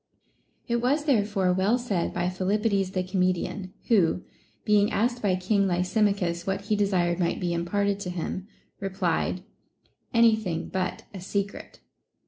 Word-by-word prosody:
It 235 - +1
was 275 +6 +1
therefore 205 -8 +2
well 195 +6 +2
said 205 -8 -1
by - - -1
Philippides 195 +1 0
the 185 - 0
comedian, 185 0 -1 0.2
who, 185 -6 +3 0.4
being 210 -1 +4
asked 240 +3 0
by 195 -3 +2
King 195 +2 +1
Lysimachus 180 -1 0
what 195 0 -1
he 210 +1 0
desired 185 -4 +1
might 170 - 0
be 175 -1 -1
imparted 200 +4 0
to 190 - -4
him, 180 +2 -4 0.3
replied, 185 -2 -1 0.7
Any 230 -1 +5
thing 180 -7 -4
but 185 -1 -2
a 195 - -6
secret. 200 +2 -4
195 Hz, 140 wpm, -26 LUFS, 180-210 Hz, 0.7 s, Any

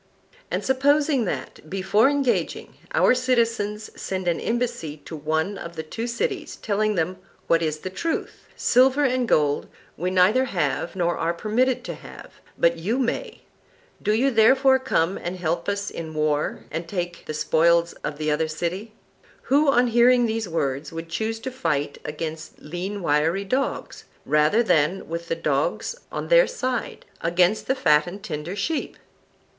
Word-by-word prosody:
And - - -2
suppose 285 +3 +3
that, 195 - -2
before 195 - +3
engaging, 280 -3 -1 0.2
our - - +4
citizens 230 -4 0
send 185 -1 -4
an 170 - +1
embassy 235 -10 -2
to 160 - -7
one 160 +6 -1
of 170 0 -8
the 160 - -4
two 225 +9 -5
cities, 320 - -2
telling 215 0 0
them 180 +2 -1 0.3
what 165 0 +3
is 155 -2 -1
the 185 - -5
truth: 330 - -4
Silver 260 +3 +4
and 255 -2 +1
gold 145 -7 +2 0.3
we 180 +4 -1
neither 190 +8 +4
have 175 - -1
nor 175 -2 0
are 165 +1 0
permitted 240 +7 +1
to - - -5
have, - - -12 0.3
but 170 0 +2
you 210 +9 -1
may; 255 -3 -2 0.6
do 210 - +1
you 250 +6 +3
therefore 265 +4 +5
come 185 -7 0
and 175 +2 -4
help 170 +2 -1
us 200 0 -2
in 160 -1 -7
war, 150 -1 0
and 165 +1 -4
take 175 -2 -4
the - - -3
spoils 170 +2 +3
of 150 -1 -3
the 155 0 -1
other 155 +2 +1
city: 175 +7 -4 0.5
Who, 290 +3 +3
on 250 -2 +4
hearing 240 +1 +5
these 220 -3 -2
words, 140 -3 -2
would 165 0 -7
choose 220 +7 -2
to 260 - -4
fight 150 - -2
against 155 +1 -6
lean 185 +5 -5
wiry 165 +6 +1
dogs, 260 +7 -2 0.2
rather 150 +10 +3
than, 165 -2 +1
with 170 +1 -5
the 165 - -1
dogs - - -1 0.2
on - - -4
their - - +6
side, 255 - -3 0.2
against 175 +5 +2
fat 165 - +3
and 195 +3 -8
tender 160 -1 -5
sheep? 310 +10 -2
190 Hz, 160 wpm, -24 LUFS, 165-245 Hz, 0.6 s, their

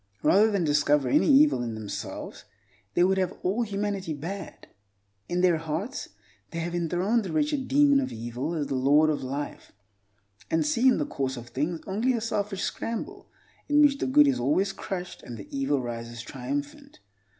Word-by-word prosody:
Rather 210 +4 +5
than 200 -4 0
discover 145 -2 +2
any 300 - +3
evil 285 - +5
in 115 -2 -3
themselves, 110 -2 -6 0.5
they 175 - +4
would 190 +1 +3
have 185 -1 -1
all 200 +6 +1
humanity 200 -5 -2
bad. 185 +7 -7 0.6
In 175 +1 0
their 180 -3 +4
hearts 165 - -4 0.4
they 170 - -7
have 170 +1 -3
enthroned 175 +7 +1
the 190 - -5
wretched 295 -3 0
Demon 285 0 +5
of 270 - -2
Evil 120 +8 -4
as 150 -3 -1
the 140 - -4
Lord 145 +4 +4
of 150 - -2
Life, 140 +3 -5 0.8
and 160 -1 +1
see 230 - +2
in 255 - +5
the 150 - 0
course 135 -2 -3
of 120 0 -9
things 160 +5 -2
only 220 +7 0
a 235 - 0
selfish 205 -3 -2
scramble 375 - -4 0.4
in 295 0 +4
which 285 -2 +5
the - - -1
good 290 +3 +6
is 275 - +1
always 185 +10 +1
crushed 180 -2 -6
and 120 - -8
the 100 - -10
evil 135 +1 +1
rises 120 0 -6
triumphant. 140 +4 -5
175 Hz, 180 wpm, -27 LUFS, 145-225 Hz, 0.8 s, good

